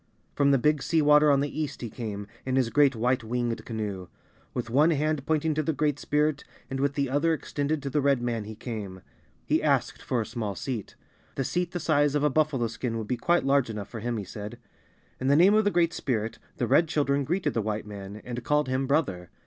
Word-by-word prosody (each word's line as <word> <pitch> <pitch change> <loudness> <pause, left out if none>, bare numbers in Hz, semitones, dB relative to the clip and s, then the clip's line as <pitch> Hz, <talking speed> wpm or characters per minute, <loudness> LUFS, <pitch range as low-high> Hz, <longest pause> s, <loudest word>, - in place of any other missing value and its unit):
From 140 -1 +3
the 140 - +5
Big 150 +3 +2
Sea 160 +1 +2
Water 150 0 +6
on 140 -1 +4
the 145 +2 -2
east 150 - -4
he 120 - -4
came, 105 -4 -5 0.2
in 130 0 -1
his 125 -3 +2
great 140 +1 +4
white 125 +2 +1
winged 120 0 -2
canoe. 105 -5 -4 0.4
With 120 -2 -3
one 150 +6 +5
hand 155 -2 0
pointing 160 0 +1
to 155 - 0
the 155 +1 -1
Great 145 0 0
Spirit, 150 0 0 0.3
and 135 - -2
with 140 0 0
the 140 -1 +1
other 145 +5 +2
extended 145 0 -2
to 140 - -2
the 150 - +1
Red 140 -2 +3
man 120 -3 -2
he 110 +1 -8
came. 105 -5 -6 0.4
He - - +2
asked - - +1
for 125 - -1
a 110 - -1
small 105 -4 -4
seat. 120 -7 -5 0.4
A 135 - +1
seat 175 +6 -1
the 175 - -4
size 145 -2 +2
of 145 - +1
a 150 - +3
buffalo 145 -4 +1
skin 115 +1 -3
would 110 -2 -4
be 125 - 0
quite 175 +8 +1
large 135 -2 +3
enough 105 -2 -5
for 115 - -6
him, 120 +1 -2
he 105 - -3
said. 105 +2 -7 0.6
In 130 - -2
the 140 - +5
name 180 +6 +6
of 215 0 +4
the - - +5
Great 170 -4 +2
Spirit, 115 -3 -2 0.2
the - - 0
Red 160 +5 +4
Children 140 -2 +1
greeted 160 +1 -1
the 115 - 0
White 105 0 -3
man, 100 0 -8
and 125 0 -5
called 150 +1 +1
him 130 +1 0
"brother." 100 - 0
135 Hz, 235 wpm, -27 LUFS, 115-150 Hz, 0.6 s, Water